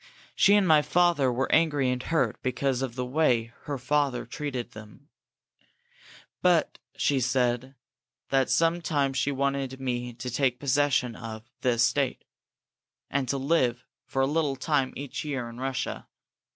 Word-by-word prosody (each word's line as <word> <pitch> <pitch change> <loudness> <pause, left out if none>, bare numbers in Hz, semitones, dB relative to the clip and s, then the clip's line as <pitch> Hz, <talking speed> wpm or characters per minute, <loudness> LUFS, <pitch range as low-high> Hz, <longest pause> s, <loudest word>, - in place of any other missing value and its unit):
She 200 - +5
and 205 -3 +3
my 155 -2 +6
father 170 -5 +2
were 130 +2 -1
angry 145 -5 +3
and 125 0 -2
hurt 165 +3 0
because 130 0 -1
of 130 -3 -3
the 125 -1 -2
way 125 -5 +1
her 145 -1 -3
family 135 0 0
treated 125 -1 -5
them, 110 +6 -13 1.3
but 175 -4 +2 0.2
she 140 -2 +2
said 125 +1 0 0.5
that 135 -1 +2
some 165 +7 +2
time 145 -5 0
she 135 +2 0
wanted 135 -1 -1
me 125 -2 -3
to 125 +2 -6
take 125 0 +1
possession 140 -4 +1
of 110 -2 -7 0.2
the 125 -2 +2
estate, 130 +4 +1 0.9
and 135 -3 -1
to 140 - 0
live 130 -4 +1 0.2
for 135 - 0
a - - +4
little 145 -1 0
time 135 -2 0
each 140 -1 -5
year 135 -5 -3
in 115 +1 -10
Russia. 135 0 -3
135 Hz, 150 wpm, -27 LUFS, 125-145 Hz, 1.3 s, my